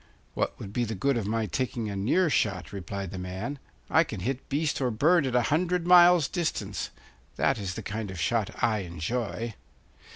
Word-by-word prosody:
'What - - -1
would 100 - -8
be 120 - +1
the 110 -1 -3
good 135 +8 +1
of 110 -4 -1
my 110 +1 0
taking 120 +2 -2
a 100 - -4
near 125 - +2
shot?' 95 - 0
replied 100 -1 -5
the 95 - -5
man; 95 +10 -5 0.3
'I 160 - +4
can 110 - -6
hit 130 +6 -3
beast 145 +1 0
or 130 - +2
bird 150 +7 +3
at 125 - -2
a 125 - +4
hundred 180 +1 +1
miles' 175 -3 +7
distance. 110 - -2 0.5
That 135 -4 +1
is 95 -2 -4
the - - -6
kind 110 0 -4
of 95 -2 -7
shot 110 +4 +1
I 110 -2 +3
enjoy. 105 +6 -3
115 Hz, 195 wpm, -28 LUFS, 100-140 Hz, 0.5 s, miles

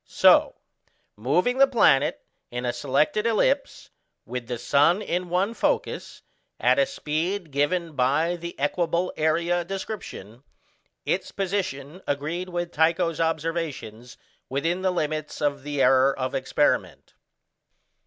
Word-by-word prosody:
So, - - +5 0.6
moving 180 - +1
the 275 - +7
planet 150 - +3 0.2
in 125 +1 -4
a 120 - 0
selected 145 - +1
ellipse, 265 +5 0 0.3
with 125 -2 -5
the 120 -1 -3
sun 145 - +3
in 180 -3 -3
one 190 +5 0
focus, - - -2 0.4
at - - +3
a 275 - +3
speed 170 - -3
given 160 +5 0
by 145 +7 +2
the 170 -2 -8
equable 170 +4 0
area 170 +3 +1
description, 175 - -7 0.6
its - - -1
position 185 -5 -3
agreed 155 +6 -2
with 175 -1 -3
Tycho's 165 +1 +1
observations 155 -8 -3 0.3
within 165 +7 -1
the 190 - +2
limits 155 -3 -3
of 145 -2 0
the 145 -1 -1
error 135 +1 +4
of 130 -1 -3
experiment. - - 0
165 Hz, 125 wpm, -25 LUFS, 140-180 Hz, 0.6 s, the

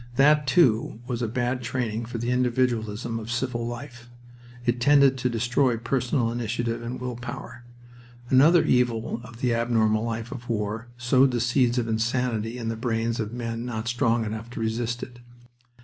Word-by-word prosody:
That, 150 +1 +4
too, 120 -8 +3
was 125 -1 -3
a 120 - 0
bad 125 +2 -1
training 120 -2 -2
for 120 +1 -5
the 120 +2 -1
individualism 120 -2 0
of 110 0 -8
civil 120 -1 -2
life. 120 0 -8 0.6
It 120 0 0
tended 140 0 +5
to 125 - 0
destroy 120 +2 +1
personal 120 +1 0
initiative 115 0 -2
and 120 +2 -5
willpower. 120 0 -6 0.6
Another 150 +7 +6
evil 120 -2 +1
of 125 -2 -12
the 125 -2 +2
abnormal 115 -2 +2
life 115 0 -4
of 120 0 -8
war 110 +1 -2
sowed 125 +3 +4
the 120 -1 -1
seeds 125 +1 +2
of 120 -2 0
insanity 115 0 -1
in 115 -2 -4
the 115 - -1
brains 115 0 -1
of 110 -1 -2
men 115 -1 -4
not 115 -2 -4
strong 115 -1 +1
enough 110 +2 -5
to 125 - -7
resist 115 +2 -2
it. 120 -1 -10
120 Hz, 165 wpm, -25 LUFS, 115-125 Hz, 0.6 s, Another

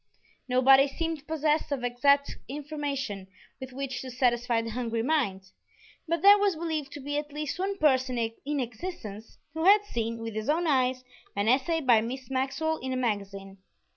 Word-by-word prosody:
Nobody 270 +2 +6
seemed 320 0 -4
possessed 310 -1 0
of 270 -3 -2
exact 280 +4 +2
information 280 -8 -4 0.3
with 260 0 -8
which 265 0 -4
to 260 - -7
satisfy 245 -1 +1
the 230 - -5
hungry 230 -1 -2
mind, 200 -10 -1 0.6
but 335 0 -1
there 405 +1 +8
was 400 -3 +2
believed 315 -3 -3
to - - -7
be 290 +1 -2
at 295 0 -8
least 300 +2 -4
one 395 +1 -1
person 260 -6 +2
in 235 +6 -2
existence 225 - -6 0.2
who 320 +1 -2
had 410 +2 +7
seen, 230 - -3
with 225 -1 -5
his 215 +3 -4
own 330 +3 +2
eyes, 255 -4 +1 0.3
an 200 +1 0
essay 280 +7 +2
by 240 -6 +5
Miss 255 +2 -6
Maxwell 275 +5 -1
in 260 0 -4
a - - -1
magazine. 200 -4 -3
265 Hz, 170 wpm, -28 LUFS, 235-300 Hz, 0.6 s, there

